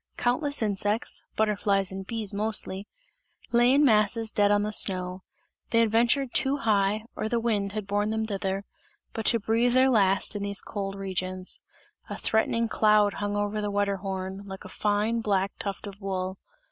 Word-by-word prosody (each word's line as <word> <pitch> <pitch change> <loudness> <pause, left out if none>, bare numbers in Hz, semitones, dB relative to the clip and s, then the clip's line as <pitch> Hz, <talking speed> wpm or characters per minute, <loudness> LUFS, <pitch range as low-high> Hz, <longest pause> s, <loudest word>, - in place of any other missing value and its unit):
Countless 285 +2 0
insects 205 +2 -1
(butterflies 200 -3 +1
and 190 0 -7
bees 220 -3 -3
mostly) 205 -1 0 0.6
lay 240 +1 +5
in 285 +2 +5
masses 220 -1 +3
dead 205 -1 +3
on 205 0 +3
the 210 - -2
snow; 185 -2 0 0.5
they 230 - +3
had 230 -2 +3
ventured 240 +3 +2
too 270 +1 +2
high, 210 -2 +1
or 215 - -3
the 235 - +1
wind 205 -4 -1
had 215 -2 -4
borne 205 +1 0
them 220 0 -1
thither, 195 -1 -3 0.5
but 225 - -3
to 230 - +3
breathe 230 +3 +1
their 260 +1 +5
last 195 -2 +2
in 205 - -3
these 200 -1 0
cold 195 -1 -5
regions. 185 -1 -2 0.5
A - - -5
threatening 230 +1 +1
cloud 210 -2 +3
hung 205 0 -1
over 205 +1 -1
the 205 - -2
Wetterhorn, 195 -1 -2
like 190 -1 -8
a - - -8
fine, 210 +4 0
black 200 -2 0
tuft 200 0 -4
of 200 0 -10
wool. 190 -1 -3
205 Hz, 170 wpm, -27 LUFS, 195-225 Hz, 0.6 s, lay